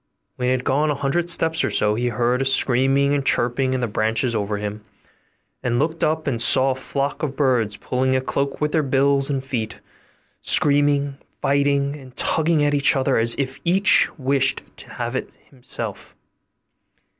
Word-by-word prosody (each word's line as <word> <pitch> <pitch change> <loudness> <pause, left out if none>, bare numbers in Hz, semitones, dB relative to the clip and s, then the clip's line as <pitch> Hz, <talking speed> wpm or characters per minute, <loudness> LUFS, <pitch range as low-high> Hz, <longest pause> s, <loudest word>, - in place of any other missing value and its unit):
When 125 - -2
he - - +2
had 130 -1 -1
gone 145 +3 +1
a 145 - 0
hundred 145 +5 -1
steps 160 -1 +1
or - - 0
so, 105 0 +1
he 120 +3 -1
heard 120 +2 0
a - - 0
screaming 135 +2 +2
and 145 -1 0
chirping 130 +1 +1
in 130 - -2
the 120 - 0
branches 110 +3 -1
over 105 -1 -2
him, 105 +1 -5 0.8
and 120 -1 -1
looked 160 +4 -1
up 155 +1 0
and 120 -5 -1
saw 130 +3 +3
a - - -2
flock 140 +2 -3
of 140 -3 -3
birds 125 -7 +1
pulling 130 +1 -1
a - - +2
cloak 140 +1 -2
with 150 0 -1
their 160 - +2
bills 140 0 +2
and 135 -2 -2
feet; 115 -5 -4 0.6
screaming, 145 -1 +2 0.2
fighting, 140 0 +1
and 130 -3 -14
tugging 160 -1 +2
at 145 0 +1
each 145 0 +3
other 135 0 +1
as 115 +1 +3
if 135 -1 -3
each 190 +3 +3
wished 135 -1 +1
to - - -11
have 120 0 -5
it - - -3 0.2
himself. 130 -3 -7
135 Hz, 180 wpm, -21 LUFS, 125-145 Hz, 0.8 s, saw